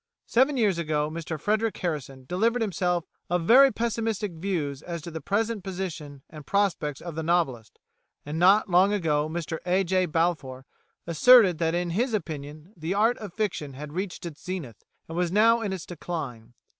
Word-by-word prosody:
Seven 265 +4 +2
years 205 -7 +2
ago 155 -2 -1
Mr 160 -1 -5
Frederic 215 +5 0
Harrison 140 -6 -4
delivered 225 - +1
himself 180 -4 -1 0.2
of 175 0 0
very 265 +9 +7
pessimistic 225 -3 -2
views 160 -5 -3
as 170 0 -5
to 170 - -7
the 160 0 -6
present 210 +4 -1
position 165 -7 -6
and 155 -2 -11
prospects 165 -6 0
of 170 -1 -6
the 160 - -3
novelist, 155 -10 -1 0.5
and 150 +2 -4
not 195 +5 +5
long 185 +2 +4
ago 155 -6 0
Mr 165 0 -4
A. 185 +2 +2
J. 185 0 +1
Balfour 155 -6 -1 0.4
asserted 185 +1 +6
that 165 0 +1
in 175 0 -1
his 230 +6 0
opinion 155 0 -6
the 165 +3 -3
art 225 +4 +2
of 210 -4 -7
fiction 180 -10 -2
had 145 +2 -8
reached 185 0 -4
its 160 -4 -8
zenith, 175 - -6 0.2
and 165 - -7
was 175 -1 0
now 230 +4 +4
in 205 -3 -2
its 185 -3 -5
decline. 135 -9 -6
175 Hz, 175 wpm, -26 LUFS, 155-200 Hz, 0.5 s, very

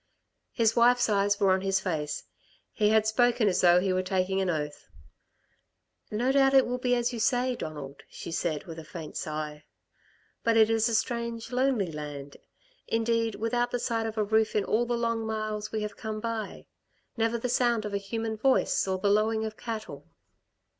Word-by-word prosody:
His 225 -2 +2
wife's 245 0 +4
eyes 200 0 +2
were 195 -1 +4
on 190 0 +2
his 195 0 +1
face. 155 -6 -3 0.5
He 210 -2 +2
had 220 0 +4
spoken 235 0 +3
as 185 - +2
though 175 0 +6
he 185 0 0
were 185 - +1
taking 190 +1 0
an 190 - 0
oath. 150 -3 -4 1.2
"No 240 +5 0
doubt 270 0 +4
it 265 - +7
will 250 +1 -3
be 245 0 +2
as 240 0 0
you 235 - -4
say, 250 +3 +1
Donald," 145 - -7
she - - -8
said, 165 -2 -2
with 165 -2 -9
a - - -8
faint 155 -1 -9
sigh. 150 -1 -4 0.8
"But 230 -1 +3
it 220 0 +5
is 225 +1 +2
a 230 - 0
strange 235 0 -2
lonely 250 -8 +1
land, 145 -2 -7 0.5
indeed, 230 -1 0
without 240 +3 0
the 245 - -1
sight 230 -2 -1
of 220 0 -6
a 215 - +2
roof 220 +1 +1
in 210 - +1
all 235 +2 +1
the 240 0 0
long 230 -1 -1
miles 215 -1 -3
we 215 -1 -2
have 210 -1 -6
come 220 -1 -4
by. 225 -2 -4 0.5
Never 225 0 0
the 235 - -3
sound 240 -3 +1
of 210 - -5
a 200 - 0
human 220 +2 -3
voice, 260 -3 +2
or 190 0 0
the 200 - -1
lowing 220 +1 +2
of 215 -1 -5
cattle." 220 -2 -6
220 Hz, 195 wpm, -28 LUFS, 190-235 Hz, 1.2 s, it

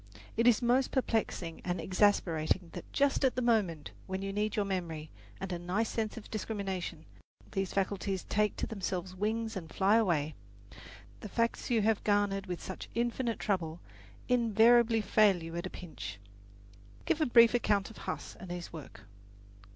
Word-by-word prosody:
It 230 +2 +3
is 245 0 +5
most 250 +2 +3
perplexing 220 - -1
and 175 -1 -2
exasperating 185 -3 +1
that - - -8
just 280 0 +2
at 265 - +3
the 255 - 0
moment 200 -10 +1 0.2
when 190 0 -3
you 195 0 -3
need 210 +1 -1
your 205 - +1
memory 165 -5 -4 0.3
and 190 -1 -4
a 175 - -3
nice 190 +6 -1
sense 220 0 -2
of 220 - -10
discrimination, 200 -4 -4 0.5
these 195 -2 -1
faculties 195 -1 -1
take 210 0 +1
to - - -2
themselves 185 -3 -4
wings 220 +3 -2
and 165 -4 -6
fly 200 +3 +4
away. 160 -9 +1 0.9
The 210 - -8
facts 230 +3 -1
you 230 -4 +3
have 220 -1 +2
garnered 205 -1 +1
with 180 -1 -5
such 190 - -7
infinite 235 0 0
trouble 175 -5 -1 0.5
invariably 230 -1 +5
fail 200 -3 +4
you 165 0 -7
at 170 - -3
a - - -7
pinch. 105 - -8 0.9
"Give 315 - +1
a 310 - +3
brief 235 -1 +7
account 205 -4 +1
of - - -14
Huss - - -5
and 185 - -9
his 175 -1 -6
work." 145 -10 -10
200 Hz, 165 wpm, -32 LUFS, 180-225 Hz, 0.9 s, brief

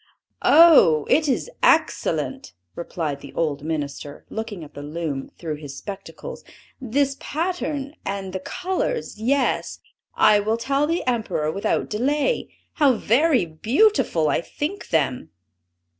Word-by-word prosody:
"Oh, 295 - +7
it 310 +3 +4
is 260 - 0
excellent!" 270 0 +1 0.2
replied 155 -4 -4
the - - -11
old 150 -3 -1
minister, 145 -2 -5
looking 220 -5 -5
at 150 - -13
the 145 - -8
loom 150 -2 -4
through 155 -3 -4
his 145 -3 -9
spectacles. 200 -2 -8 0.4
"This 270 +3 0
pattern, 305 -4 -3
and 195 -1 -4
the 190 - -2
colors, 375 - -3
yes, 265 +3 0 0.4
I 210 -1 +5
will 215 +2 0
tell 275 +5 0
the 335 +2 -1
Emperor 220 -11 -1
without 195 +4 -1
delay, 285 - 0 0.2
how 285 -4 +4
very 255 - +3
beautiful 215 - +2
I - - +1
think 310 - -5
them." 130 - 0
220 Hz, 130 wpm, -23 LUFS, -, 0.4 s, Oh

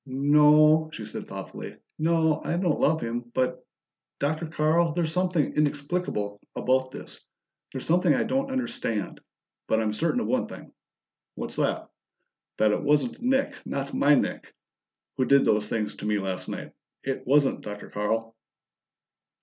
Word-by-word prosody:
"No," 150 +3 +5
she 110 - -7
said 105 - -7
thoughtfully. - - -8 0.2
"No, 160 -1 +2
I 170 - -1
don't 175 -4 +1
love 160 +2 +2
him, 120 +1 -3
but 130 -1 0 0.5
Dr. 155 +3 -1
Carl, 160 +1 +2
there's 165 -1 0
something 180 -3 +1
inexplicable 145 - -1
about 130 +1 +1
this. - - -10 0.5
There's 130 - -6
something 175 0 +3
I 135 - +3
don't 270 +1 -1
understand, 240 - -3 0.5
but 110 - +2
I'm 110 -1 0
certain 105 - 0
of - - -2
one - - 0
thing!" - - -11 0.6
"What's - - -5
that?" - - 0 0.7
"That 110 -1 +4
it - - 0
wasn't 150 - +1
Nick 265 +3 0
not 140 0 -4
my 145 +1 +5
Nick - - -2 0.7
who 130 - +2
did 140 +1 +5
those 105 0 +2
things 105 -2 -1
to 105 - -5
me 105 0 +2
last 95 -2 -3
night. - - -6 0.3
It 135 -2 -4
wasn't, 140 +1 +3
Dr. 105 0 -8
Carl!" 115 +2 -2
145 Hz, 150 wpm, -26 LUFS, 115-160 Hz, 0.7 s, No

